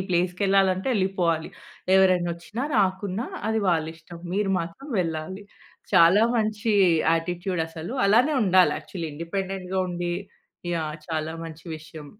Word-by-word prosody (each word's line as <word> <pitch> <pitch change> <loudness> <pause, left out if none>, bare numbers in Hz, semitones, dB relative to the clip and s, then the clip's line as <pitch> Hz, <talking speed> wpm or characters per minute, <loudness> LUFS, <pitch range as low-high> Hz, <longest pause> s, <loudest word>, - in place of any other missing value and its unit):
ప్లేస్‌కెళ్ళాలి 185 +2 +2
అంటే 190 +8 -4
ఎళ్లిపోవాలి. 180 -5 0 0.5
ఎవరైనొచ్చినా 185 +4 +2
రాకున్నా 195 +4 0 0.2
అది 220 0 +1
వాళ్లిష్టం. 160 0 -2
మీరు 200 0 0
మాత్రం 170 - -8
వెళ్ళాలి. 170 +4 -4 0.5
చాలా 170 +6 +6
మంచి 215 0 0 0.4
యాటిట్యూడ్ 175 +1 -1
అసలు. 165 +6 -7
అలానే 250 +9 +4
ఉండాలి 185 -2 +5
యాక్చువల్లీ. 170 -4 -6
ఇండిపెండెంట్‌గా 190 +3 -4
ఉండి 175 0 -2 0.6
యాహ్! 155 -2 -2
చాలా 160 -1 -2
మంచి 165 -1 -10
విషయం. 155 -1 -11
180 Hz, 115 wpm, -25 LUFS, 165-195 Hz, 0.6 s, చాలా